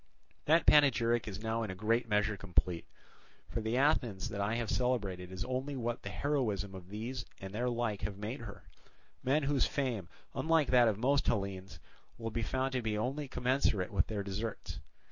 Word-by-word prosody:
That 160 +3 +4
panegyric 120 -6 +5
is 105 +1 -6
now 115 +1 0
in 110 - -2
a 95 - -4
great 115 +4 +1
measure 105 0 +2
complete; 90 -3 0 0.6
for 115 - -3
the 110 +3 0
Athens 120 -9 +2
that 100 - -3
I 105 +3 +1
have 120 -1 -1
celebrated 100 -8 0
is 95 +4 -4
only 130 +3 -2
what 120 -2 -2
the 100 - -5
heroism 105 -6 -1
of 95 -1 -9
these 115 +5 -4 0.2
and 95 0 -7
their 120 +4 0
like 120 -4 -1
have 100 -2 -3
made 110 +6 -4
her, 100 -4 -9 0.6
men 140 +4 +2
whose 140 -1 +2
fame, 120 - -2 0.2
unlike 160 -3 +2
that 125 -2 +7
of 105 -3 +1
most 135 +5 +2
Hellenes, 100 -5 -2 0.4
will 115 -1 -4
be 115 - -1
found 130 +4 0
to 130 -1 0
be 110 -2 -1
only 135 +6 -2
commensurate 125 -7 +1
with 95 -5 +2
their 105 -2 -2
deserts. 100 +3 -4
115 Hz, 185 wpm, -33 LUFS, 100-130 Hz, 0.6 s, that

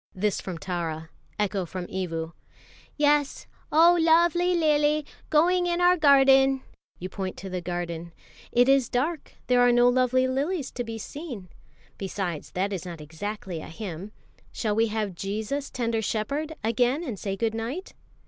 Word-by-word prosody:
'" - - -35
This 210 - +1
from 185 -3 -5
Tara. 165 -3 -4 0.3
Echo 200 -2 0
from 180 +1 -6
Evu: 165 -3 -4 0.6
"Yes; 295 -1 +2 0.3
'Oh, 340 +3 +6
luvvly 345 +2 +4
lily 300 -1 +2 0.2
g'oing 355 +3 +3
in 345 0 0
our 355 0 +5
garden!'" 270 -3 +5 0.3
You 185 - -5
point 190 0 -4
out - - -10
to 195 - -6
the 180 -1 -3
garden: 170 -1 -4 0.4
"It 245 +1 +4
is 270 -3 +4
dark, 295 +6 -2
there 250 -1 +3
are 245 0 +6
no 240 0 +5
lovely 255 +1 +2
lilies 280 +3 -1
to 245 - -4
be 225 -1 -6
seen; 235 - -7 0.5
besides, 190 -5 -4
that 195 +2 -1
is 185 - -4
not 175 -3 -7
exactly 170 +3 -6
a - - -9
hymn; 185 +1 -7 0.4
shall 215 -3 -1
we 225 +2 +2
have 215 -3 -2
'Jesus, 215 +10 -3
tender 230 -2 -1
Shepherd,' 280 +10 -2
again, 245 +7 +1
and 235 - -5
say 195 -1 -3
good 220 +2 -1
night?" 240 - -5
230 Hz, 165 wpm, -26 LUFS, 190-290 Hz, 0.6 s, Oh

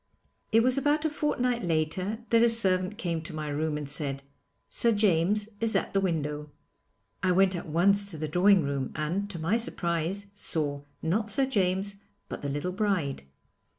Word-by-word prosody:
It 225 +1 +5
was 255 +2 +3
about 295 +3 +1
a 315 - +1
fortnight 250 -5 0
later 180 +7 -1
that 230 -1 +5
a 235 - +6
servant 190 -3 +2
came 170 -7 -2
to 160 0 -7
my 155 -1 -4
room 150 +1 -1
and 150 -1 -5
said, 140 -2 -4 0.4
'Sir 235 - +1
James 205 0 +2
is 225 -1 -1
at - - 0
the 195 - +2
window.' 150 -4 -2 0.7
I 185 - +2
went 190 +1 +4
at 175 - -5
once 200 +5 +3
to 165 - -5
the 155 0 -3
drawing 180 +3 +4
room 140 -2 -2
and, 175 +7 -2
to 190 - -5
my 165 +8 +1
surprise, 190 -2 -2
saw, 150 -7 -2 0.2
not 210 +7 0
Sir 265 +7 +3
James, 200 -4 0 0.3
but - - -6
the 140 - -3
little 145 +6 -2
bride. 185 -8 -1
185 Hz, 180 wpm, -28 LUFS, 155-210 Hz, 0.7 s, a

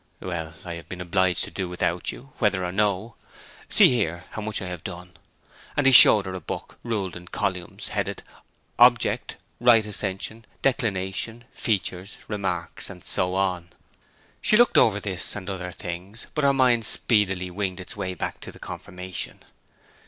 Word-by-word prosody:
'Well, 80 -3 -5
I 85 - -5
have 85 -1 -9
been 95 - -7
obliged 90 0 +1
to - - -6
do 95 -2 -3
without 90 0 -1
you, 135 +1 -12
whether 100 -5 +2
or 90 - -3
no. 105 +3 0 0.6
See - - +7
here, 90 -9 -1
how 110 - -5
much 105 0 -2
I 95 - -5
have 90 -3 -6
done.' 90 +1 -8 0.6
And 145 - +2
he 135 - +7
showed 105 -5 +9
her 95 - -5
a 95 - -4
book - - -7
ruled 105 -6 -3
in 90 0 -10
columns, 90 -1 -3
headed - - -3 0.6
'Object,' - - +4 0.2
'Right 115 -3 +5
Ascension,' 105 +2 -2 0.2
'Declination,' 110 -2 -1
'Features,' 95 -2 -2
'Remarks,' 95 -5 -3
and 90 -3 -11
so 90 0 +1
on. 90 -3 -1 0.7
She 215 - +5
looked 240 0 +5
over 105 -2 +4
this 95 -3 -2
and 95 -3 -7
other 90 -2 -4
things, 90 +3 -7
but 150 - -1
her 140 - +5
mind 125 -4 +3
speedily 95 -5 +2
winged 95 0 -3
its 90 - -6
way 95 -2 -3
back - - -4
to - - -8
the - - -12
confirmation. 90 0 -7
95 Hz, 165 wpm, -25 LUFS, 90-110 Hz, 0.7 s, showed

